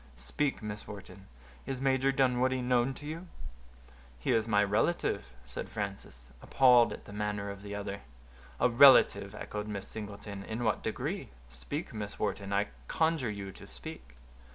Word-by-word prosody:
"Speak, 65 - -2
Miss 105 0 -6
Wharton; 95 -1 -10 0.4
is 135 -1 -3
Major 135 0 +2
Dunwoodie 130 -1 +2
known 125 +1 +2
to 145 - -10
you?" 165 +4 -6 0.9
"He 65 - -1
is 115 -1 +2
my 105 -2 +4
relative," 105 - +1 0.2
said 65 - -6
Frances, 95 - -6
appalled 125 -3 +5
at - - -8
the 100 - -10
manner 105 -1 -2
of 100 0 -9
the 100 0 -6
other. 100 -1 -5 0.6
"A - - +5
relative!" 115 -6 +6
echoed 105 0 -5
Miss 100 -2 -4
Singleton; 100 -2 -7
"in 110 +4 -4
what 110 -2 +1
degree?—speak, 60 0 -5
Miss 105 -2 -5
Wharton, 100 -1 -2
I 100 +1 +1 0.2
conjure 160 -6 +1
you 100 -2 -5
to - - -13
speak." 60 -1 -9
105 Hz, 155 wpm, -31 LUFS, 100-125 Hz, 0.9 s, relative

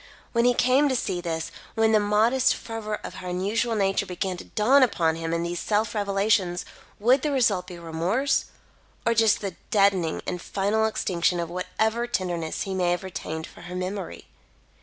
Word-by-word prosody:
When 235 0 +2
he 245 0 +4
came 260 +5 +4
to 260 - +1
see 180 -7 -1
this 165 -2 -3 0.2
when 225 0 +3
the 215 - +5
modest 220 +6 +3
fervour 225 -2 -5
of - - -6
her 180 - -7
unusual 210 +6 0
nature 195 -2 +1
began 185 +1 -3
to - - -9
dawn 255 +7 +4
upon 170 -10 +2
him 165 0 -4
in 170 0 0
these 170 0 -3
self 215 +1 0
revelations, 200 -3 +1 0.3
would 250 +6 +4
the 300 - 0
result 210 -9 +2
be 180 - -8
remorse, 175 +12 0 0.6
or 230 - +3
just 225 -2 +3
the 195 -4 -4
deadening 195 -6 +2
and 180 -1 -3
final 205 +4 0
extinction 175 -4 0
of 170 0 -3
whatever 220 +6 -1
tenderness 175 -7 -2
he 195 - -4
may 180 -2 +1
have 175 +2 0
retained 160 -4 -5
for - - -14
her 175 +1 -8
memory? 185 - -5
195 Hz, 180 wpm, -25 LUFS, 175-225 Hz, 0.6 s, the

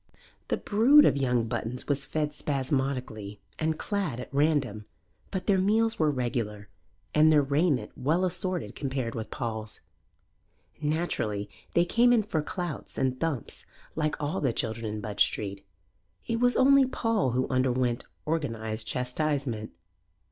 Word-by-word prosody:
The - - 0
brood 255 +9 +6
of - - +4
young 125 -4 +1
Buttons 120 +3 -3
was 140 -1 0
fed 150 -1 -2
spasmodically 130 -8 -2 0.2
and 160 0 0
clad 195 - -2
at 125 - -8
random, 140 -8 +1 0.4
but 190 - -3
their 195 -2 +3
meals 220 +4 +2
were 155 -2 +4
regular 115 -6 -2 0.4
and 155 +1 +6
their 150 -2 +5
raiment 140 0 +1
well 165 +8 +1
assorted 180 0 -2
compared 130 -4 -3
with 110 -1 -5
Paul's. 110 -3 -5 1.0
Naturally 145 -10 -1 0.2
they 170 - +5
came 240 +7 +4
in 235 -3 +4
for 170 -7 -1
clouts 175 0 -5
and 130 -1 0
thumps 155 -6 -3 0.3
like 155 -1 0
all 150 0 -2
the 130 -5 +1
children 115 -1 -2
in 105 0 -4
Budge 105 -1 -4
Street; 100 -1 -3 0.6
it 230 - -1
was 245 0 +3
only 275 0 +6
Paul 225 - 0
who 130 +1 +1
underwent 130 -2 +1 0.2
organized 115 -8 -2
chastisement. 125 -3 -1
140 Hz, 140 wpm, -28 LUFS, 120-170 Hz, 1.0 s, brood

